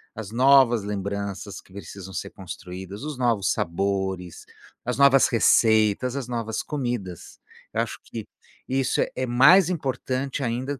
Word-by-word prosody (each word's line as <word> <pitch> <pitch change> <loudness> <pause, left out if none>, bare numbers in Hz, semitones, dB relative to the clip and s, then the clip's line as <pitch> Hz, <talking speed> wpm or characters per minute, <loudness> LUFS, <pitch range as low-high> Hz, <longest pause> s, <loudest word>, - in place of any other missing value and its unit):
as 110 -3 -7
novas 125 -3 +5
lembranças 100 0 -4
que 95 - -20
precisam 100 -1 -9
ser - - -4
construídas, 95 +2 -9
os 150 -3 -5
novos 115 -6 +1
sabores, 95 0 -2 0.4
as 125 0 -2
novas 140 -1 +6
receitas, 110 +1 +3
as 135 -3 -4
novas 115 -2 -3
comidas. 120 - -5 0.3
Eu - - +1
acho - - -4
que 110 -2 -7 0.4
isso 135 0 +1
é - - -1
é 130 - -1
mais 150 +10 +6
importante 135 -3 -3
ainda 125 +3 -3
115 Hz, 140 wpm, -24 LUFS, 100-130 Hz, 0.4 s, novas